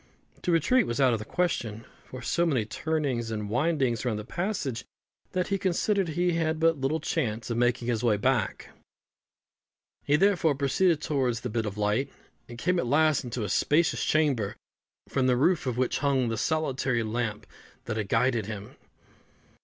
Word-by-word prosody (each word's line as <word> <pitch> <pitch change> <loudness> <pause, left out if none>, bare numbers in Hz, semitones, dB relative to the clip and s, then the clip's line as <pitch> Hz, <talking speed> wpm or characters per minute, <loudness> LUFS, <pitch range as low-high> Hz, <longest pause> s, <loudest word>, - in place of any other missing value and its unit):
To 180 - 0
retreat 195 - +3
was 120 - -2
out 130 -3 +4
of 115 - -1
the 105 - -7
question; 120 -12 -2 0.2
for 130 0 -9
so 170 - +1
many 135 -10 +1
turnings 135 -2 -2
and 105 -2 -4
windings 130 -3 +1
were 125 - 0
in 110 - -2
the 105 - -6
passage, 170 - -3 0.5
that 180 0 -1
he 195 -1 0
considered 195 +1 +1
he 175 +3 +1
had 160 -1 0
but 165 -3 +2
little 145 +4 0
chance 120 -8 -2
of 115 - -1
making 120 0 +1
his 120 -2 0
way 110 -4 +3
back. 105 - 0 1.3
He, 145 - +3
therefore, 175 -4 +3
proceeded 150 +4 +2
towards 125 -5 0
the 125 - -4
bit 110 -1 -1
of 100 0 -5
light, 105 +6 0 0.4
and 120 - -9
came 180 +7 +1
at 125 - -1
last 155 +3 +3
into 120 -2 -4
a 105 - -3
spacious 160 +9 +2
chamber, 140 -10 +1 0.5
from 130 -2 0
the 125 -1 +3
roof 150 +2 +2
of 125 -2 -1
which 130 0 0
hung 135 -4 +1
the 115 - -1
solitary 135 -5 0
lamp 110 -1 -3 0.4
that 110 - -3
had 105 -3 -3
guided 115 -2 +1
him. 105 -1 -7
130 Hz, 180 wpm, -27 LUFS, 115-160 Hz, 1.3 s, out